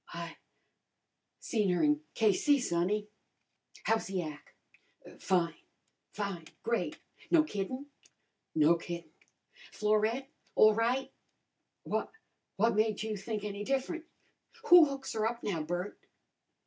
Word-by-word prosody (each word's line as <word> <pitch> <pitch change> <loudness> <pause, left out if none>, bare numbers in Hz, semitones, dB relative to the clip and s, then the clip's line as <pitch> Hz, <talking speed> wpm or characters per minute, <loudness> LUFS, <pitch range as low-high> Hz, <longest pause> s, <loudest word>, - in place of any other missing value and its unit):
"I 170 -1 -6 1.0
seen 210 -5 0
her 180 - +2
in 300 0 +3
K.C., 225 +7 +4
sonny." 205 0 0 0.8
"How's 225 0 +1
the 190 -2 -2
ac'?" 150 -2 -13
"Fine! 175 -3 +1 0.6
Fine! 200 -6 -4 0.2
Great!" 225 -10 -1 0.3
"No 330 -2 +6
kiddin'?" 255 +1 -4 0.7
"No 160 +2 +5
kiddin'." 170 -2 -7 0.6
"Florette 215 +5 +1 0.3
all 215 0 +7
right?" 240 +4 0 0.7
"Why, - - -1 0.5
what 230 +3 +3
made 215 0 +1
you 220 -1 -2
think 210 +1 -4
any 205 0 -4
different?" 275 +7 -1 0.6
"Who 350 -2 +10
hooks 275 -2 -5
her 220 0 +1
up 235 0 -7
now, 170 -6 -1
Bert?" 175 +5 -4
210 Hz, 115 wpm, -32 LUFS, 180-240 Hz, 1.0 s, Who